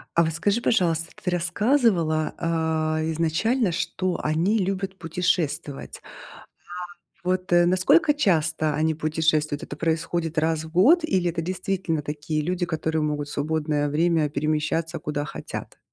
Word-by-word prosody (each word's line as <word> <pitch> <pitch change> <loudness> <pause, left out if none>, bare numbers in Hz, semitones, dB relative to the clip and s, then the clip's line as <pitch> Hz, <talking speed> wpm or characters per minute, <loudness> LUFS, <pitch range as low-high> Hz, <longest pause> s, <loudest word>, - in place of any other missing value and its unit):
А 170 - +5
вот 160 - -1
скажи, 205 +7 0
пожалуйста, 170 -7 +1
ты 180 - 0
рассказывала, 175 - +1 0.6
э, 160 +1 -1
изначально, 180 +8 +1
что 185 +2 -2
они 170 +8 +1
любят 195 0 -2
путешествовать. 165 -3 -2 1.2
А - - -7
вот 185 -1 -1
насколько 185 - +4
часто 160 - +1
они 160 +1 +1
путешествуют? 155 -1 0
Это - - -7
происходит 165 0 -1
раз 160 0 +1
в 160 - -11
год, 275 - +5
или 185 - +1
это 165 0 -2
действительно 180 -2 -2
такие 150 +1 -3
люди, 175 +3 -1
которые 160 -1 -1
могут 150 -1 -2
в - - -9
свободное 150 -1 -1
время 160 0 +2
перемещаться 155 +3 -1
куда 145 -1 -3
хотят? - - -7
165 Hz, 135 wpm, -24 LUFS, 155-185 Hz, 1.2 s, А